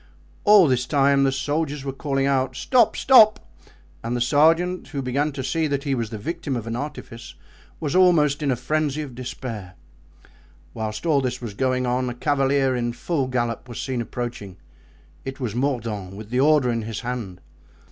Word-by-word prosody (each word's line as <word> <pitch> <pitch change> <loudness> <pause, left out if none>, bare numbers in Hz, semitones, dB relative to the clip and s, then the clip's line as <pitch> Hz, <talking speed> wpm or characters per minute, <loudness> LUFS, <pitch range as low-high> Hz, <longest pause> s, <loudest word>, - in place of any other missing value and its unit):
All 205 -5 +7
this 125 -2 0
time 140 -1 +3
the 135 - +2
soldiers 145 +1 -2
were 135 - -3
calling 135 -1 -1
out, 135 -1 0
"Stop! 240 -4 +2
stop!" 220 -5 +6 0.6
and 120 +2 -2
the - - -2
sergeant, 165 +8 +2
who 140 -3 -4
began 140 +4 0
to 135 -1 -5
see 160 +4 0
that 140 -1 -2
he 140 -2 -1
was 115 -4 -2
the 110 - -6
victim 160 +4 -4
of 115 -3 -4
an 115 0 -4
artifice, 125 -3 -7 0.4
was 150 -1 -2
almost 160 -6 +4
in 145 - 0
a 130 - +2
frenzy 150 +3 -1
of 135 -4 -9
despair. 115 -6 -7 1.0
Whilst 110 +4 -5
all 150 -4 +3
this 125 -1 -2
was 115 -4 -6
going 130 +3 0
on, 125 +1 0
a 120 - -6
cavalier 135 -1 +1
in 120 -1 -2
full 140 0 -2
gallop 120 -1 -2
was 120 - -7
seen 130 -3 -2
approaching. 115 -5 -6 0.7
It 135 +1 -7
was 120 -6 -3
Mordaunt 115 -7 -2
with 110 +2 -10
the 125 - +1
order 145 -3 +4
in 115 -1 -1
his 110 -2 -5
hand. 120 -7 -5
130 Hz, 185 wpm, -23 LUFS, 120-145 Hz, 1.0 s, All